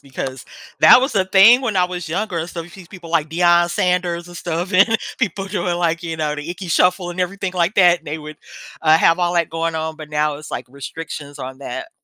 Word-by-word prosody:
Because 130 -1 -7 0.4
that - - +8
was 265 -2 -2
a 190 -2 +2
thing 200 +7 +6
when 225 -6 -2
I 180 - +4
was 180 -2 -5
younger, 175 -2 -2
so 170 -1 -6
these 175 +1 -14
people 175 -4 -12
like 155 -2 +1
Deion 175 +1 +3
Sanders 175 -1 -1
and 175 - -10
stuff 175 +4 -4
and 210 +5 +4 0.2
people 195 -5 -2
doing, 185 -3 -2
like, 170 -1 -1
you 165 -1 -4
know, 150 -1 -2
The 150 +3 -7
Ickey 175 +1 -6
Shuffle 180 +1 +2
and 175 - -5
everything 190 +1 -3
like 180 +2 0
that. 175 -3 +4
They 155 +2 -5
would, 155 0 -10 0.5
uh, 160 0 +5
have 165 +1 +3
all 175 0 0
that 170 -1 +1
going 165 0 -2
on, 160 0 -3
but 155 -1 -10
now 150 0 0
it's, 155 0 -11
like, - - -5
restrictions 145 +2 -8
on 130 +1 -7
that. 330 - -6
175 Hz, 225 wpm, -19 LUFS, 160-185 Hz, 0.5 s, that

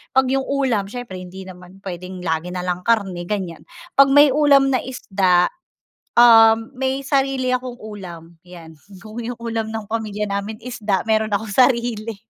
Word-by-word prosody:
pag 265 - +5
yung 270 0 -1
ulam 255 -8 0
siyempre 235 -4 -7
hindi 185 +1 -9
naman 185 +1 -14
pwedeng 180 0 -7
lagi 160 0 -2
nalang 180 0 -3
karne 190 -6 0
ganyan, 185 -6 -5 0.3
pag 275 - +8
may 290 0 +6
ulam 280 -1 +4
na 255 - +2
isda, 190 -8 +1 0.7
um, 225 0 +6
may 265 +1 -1
sarili 270 -2 +1
akong 250 -1 -6
ulam, 175 -6 -10
yan, 170 -3 -13 0.2
kung 220 +2 -8
yung 240 0 -6
ulam 225 -1 -3
ng 220 -2 -6
pamilya 210 -2 -3
namin 200 +2 -4
isda 220 -4 -3
meron 220 -1 +1
akong 205 0 -2
sarili, 235 -4 +1
220 Hz, 155 wpm, -20 LUFS, 185-245 Hz, 0.7 s, pag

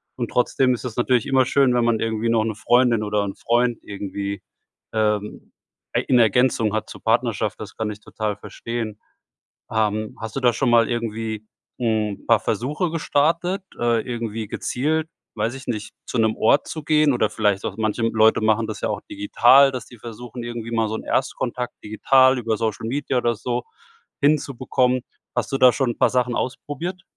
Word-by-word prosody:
Und 120 -2 -3
trotzdem 125 +1 +2
ist 120 - -5
es 120 -3 -5
natürlich 120 -1 +2
immer 130 -1 +3
schön, 135 0 +3
wenn 120 -1 +2
man 115 -2 +2
irgendwie 115 0 -1
noch 115 -1 +3
'ne 110 -1 -2
Freundin 120 0 +3
oder 105 -1 0
'n 100 -1 -4
Freund 120 0 +1
irgendwie, 100 0 -5 0.5
ähm, 105 -1 -1 0.4
ei - - +2
in 125 - +3
Ergänzung 115 -1 +3
hat 110 - -2
zur - - -10
Partnerschaft. - - 0
Das - - -8
kann 110 -1 -2
ich 105 - -9
total 105 -1 -3
verstehen. 110 0 -6 0.7
Ähm, 110 -1 -1
hast 110 -1 -6
du - - 0
da 125 -1 +5
schon 120 - 0
mal 115 -1 +4
irgendwie 115 -2 -3 0.3
'n 110 -4 -1
paar - - +5
Versuche 150 +8 -1
gestartet? 170 +4 0 0.2
Äh, 120 -1 +2
irgendwie 115 -3 -4
gezielt, 155 +9 -1 0.3
weiß 110 +2 -1
ich 135 - -10
nicht, 110 -3 -4
zu - - -4
'nem 110 -1 +2
Ort 140 +6 +3
zu 155 - -6
gehen 150 -1 +3
oder 110 -3 +1
vielleicht 105 -3 0
auch - - -4
manche, 110 +1 -1
hm, 115 - +2
Leute 110 0 +4
machen 110 +1 +2
das 110 -2 -6
ja - - -1
auch - - -2
digital, 140 - +5
dass 130 -3 -5
die 120 - -15
versuchen, 120 +2 -8
irgendwie 120 -1 -6
mal 115 -2 +1
so 110 - -3
'n - - -6
Erstkontakt 125 -1 -2
digital 130 +5 +4
über 115 -2 -1
Social 110 0 -2
Media 135 +1 -1
oder 120 -1 +1
so 120 +2 -3 0.6
hinzubekommen. 130 -3 +1 0.3
Hast - - -1
du 135 - -1
da 130 -2 +7
schon 130 -1 0
'n 120 - -6
paar - - +4
Sachen 125 -1 0
ausprobiert? 160 +7 -4
120 Hz, 190 wpm, -22 LUFS, 110-130 Hz, 0.7 s, da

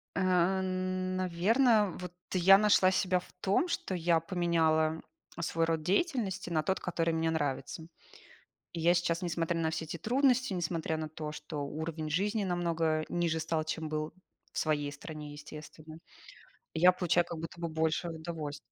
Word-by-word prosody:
Э, - - 0 0.4
н 185 0 -2
наверно, 205 +4 +3
вот 180 -1 -7 0.2
я 190 +2 +7
нашла 200 -3 +5
себя 185 -1 +2
в 180 - -15
том, 200 - +2
что 190 - -2
я 170 -1 +2
поменяла 160 -3 +1 0.4
свой 165 0 0
род 165 -1 0
деятельности 200 - 0
на 155 -2 +1
тот, 190 - 0
который 165 -2 -1
мне 160 0 +1
нравится. 150 +1 -2 0.9
И 170 - -4
я 170 +2 +4
сейчас, 170 0 0
несмотря 170 -1 -1
на 160 -1 +1
все 160 0 -3
те 165 +2 -5
трудности, 255 - +2
несмотря 165 -2 -2
на 155 -1 -4
то, 155 -1 -6
что 150 -1 -5
уровень 155 +1 -4
жизни 205 +6 0
намного 165 -3 0
ниже 170 -2 0
стал, 160 0 -1
чем 160 0 -3
был 155 0 -3 0.4
в - - -9
своей 145 -2 0
стране, 150 0 -8
естественно, 155 +1 -10 0.8
я 180 +3 +6
получаю 175 -1 +2
как 170 - -6
будто 165 +1 -7
бы 170 - -2
больше 160 +2 0
удовольств 160 -3 -5
165 Hz, 160 wpm, -31 LUFS, 160-185 Hz, 0.9 s, я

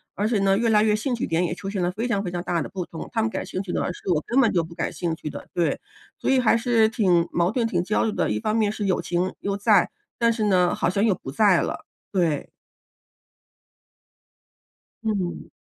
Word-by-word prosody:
而 205 - 0
且 220 -2 +1
呢， 195 0 +3
越 230 +2 +1
来 210 -1 +5
越 215 -1 +3
兴 230 +5 -2
趣 235 - -3
点 165 +2 +1
也 170 - -2
出 195 +2 -6
现 195 -2 -2
了 175 - +1
非 220 +6 -3
常 215 -5 0
非 180 - -4
常 175 -1 -3
大 175 -2 -1
的 - - -5
不 185 -3 -4
同， 165 - -7
她 225 - +1
们 225 - +1
感 - - -4
兴 185 - -4
趣 190 -3 -6
的 180 - -1
事 190 - -8
我 150 - -1
根 260 +3 +3
本 230 - +3
就 170 -3 +1
不 165 +1 -10
感 - - -3
兴 170 -2 -2
趣 155 - -6
的。 - - -8
对， 170 -1 0 0.4
所 - - -2
以 265 - +4
还 230 -2 +4
是 230 -2 +3
挺 180 -6 +2
矛 175 +2 +1
盾 230 0 0
挺 175 -6 0
焦 210 +4 +1
虑 220 - 0
的， - - 0
一 105 - 0
方 215 - -1
面 215 -2 +2
是 210 -1 -4
友 190 -2 +1
情 180 +2 -1
又 200 0 -1
在， 205 -2 +4 0.3
但 230 -1 +4
是 220 -2 -1
呢， 180 -3 +3
好 - - 0
像 200 +4 +1
又 215 - +4
不 135 - -8
在 190 +3 +4
了， - - -4 0.3
对。 170 -7 0 2.5
嗯。 200 -5 -2
195 Hz, 260 characters per minute, -24 LUFS, 175-220 Hz, 2.5 s, 来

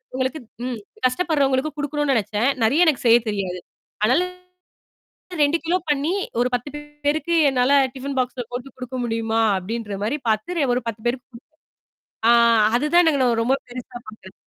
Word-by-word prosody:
உங்களுக்கு 260 +4 -2 0.3
ம் 250 -2 -3 0.3
கஷ்டப்படுறவங்களுக்கு 280 0 +1
குடுக்கணும்னு 290 -1 0
நினச்சேன். 215 +4 0
நெறைய 290 +11 +4
எனக்கு 290 -6 +1
செய்ய 230 +1 +7
தெரியாது. 190 -3 -3 0.5
அதனால 255 +10 +3 1.2
2 290 +3 +2
கிலோ 355 +2 +2
பண்ணி 295 +4 +1 0.3
ஒரு 250 - +1
10 245 +4 -4 0.4
பேருக்கு 315 +3 +1
என்னால 255 +1 +1 0.2
டிஃபன் 270 +1 -5
பாக்ஸ்ல 250 -1 -2
போட்டு 245 +2 -7
குடுக்க 255 0 -7
முடியுமா? 225 0 -1 0.2
அப்டின்ற 210 +2 -5
மாதிரி 250 +8 -1
பாரத்து 265 +5 0
ஒரு 250 - -1
10 220 -1 -8
பேருக்கு 245 +1 -3
குடு 235 - -13 0.9
ஆ - - +7 0.4
அதுதான் 325 +6 +3
நாங்கலா 275 -5 +2
நா 230 - 0
ரொம்ப 265 +3 +2
பெருசா 245 0 -8
பார்க்கிறேன். 200 -3 -12
255 Hz, 150 wpm, -22 LUFS, 230-290 Hz, 1.2 s, செய்ய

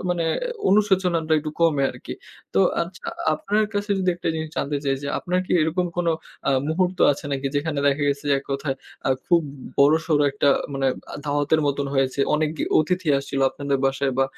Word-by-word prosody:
আ - - -6
মানে 170 -2 0 0.4
অনুশোচনাটা 185 -5 +2
একটু 155 0 -4
কমে 160 -4 +3
আরকি। - - -8 0.4
তো 95 - +4 0.2
আচ্ছা, 175 +2 -9 0.3
আপনার 210 +7 0
কাছে 205 +1 -2
যদি 185 -1 +2
একটা 175 - -3
জিনিস 160 0 -3
জানতে 145 +1 -1
চাই 135 -1 +2
যে, 140 - -3
আপনার 180 +1 -1
কি - - -2
এরকম 175 +3 0
কোন 175 -1 0 0.4
আ - - +4 0.2
মুহূর্ত 180 +2 0
আছে 140 - -9
নাকি? 135 0 -2
যেখানে 145 +1 -1
দেখা 140 +1 +2
গেছে 140 +1 -2
যে - - +5
এক 135 - -10
কথায় 135 0 -2 0.3
আ - - +2 0.2
খুব 175 -1 +4
উ 140 -1 -9 0.2
বড়-সড় 155 +1 +4
একটা 140 +1 +1 0.3
মানে 135 0 0 0.3
আ - - -6
দাওয়াতের 145 +2 +1
মতন 140 0 0
হয়েছে। 135 0 +1
অনেক 150 0 +1
গে - - 0
অতিথি 180 +2 0
আসছিল 135 0 -4
আপনাদের 140 -1 -2
বাসায় 135 0 0
বা 135 - +5
150 Hz, 195 wpm, -23 LUFS, 140-175 Hz, 0.4 s, যে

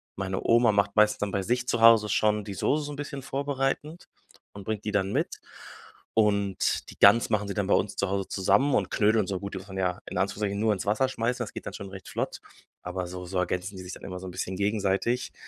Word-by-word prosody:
Meine 95 -1 -3
Oma 115 -1 +4
macht 100 -1 +1
meistens 105 0 +4
dann 105 -1 -2
bei 100 - 0
sich 125 +5 -1
zu 115 - 0
Hause 115 -2 +7
schon 105 0 +1
die 100 - -5
Soße 145 +9 0
so 145 - -6
'n - - -7
bisschen 140 -1 -6
vorbereitend 140 +4 -2 0.5
und 100 - -9
bringt 105 0 -4
die 105 - -1
dann 100 -1 +1
mit. - - -2 0.7
Und 100 -3 +1
die - - -12
Gans 105 +4 +6
machen 105 -2 0
sie 100 - -2
dann 100 -3 -1
bei - - +3
uns 100 - +1
zu 100 - 0
Hause 100 0 -1
zusammen 100 +9 +2
und - - +1
Knödel 110 -2 +2
so 95 -2 -3
gut, 100 0 -6
die - - -4
muss 95 +2 -9
man 95 -1 -8
ja 90 -1 0
in - - -6
Anführungszeichen 100 +2 -1
nur 110 +1 +2
ins 100 -3 -2
Wasser 110 +6 +2
schmeißen, 120 0 -1
das 110 - -8
geht - - -8
dann - - -5
schon 100 -2 -7
recht 95 0 -10
flott. - - -3 0.4
Aber 90 0 -4
so 90 0 -7
so 90 +1 -4
ergänzen 90 +2 -2
die 95 - -8
sich 90 - -8
dann - - -10
immer 90 -1 -6
so 95 - -8
'n 90 - -6
bisschen 95 +1 -4
gegenseitig. 105 +4 0
100 Hz, 250 wpm, -27 LUFS, 95-115 Hz, 0.7 s, Hause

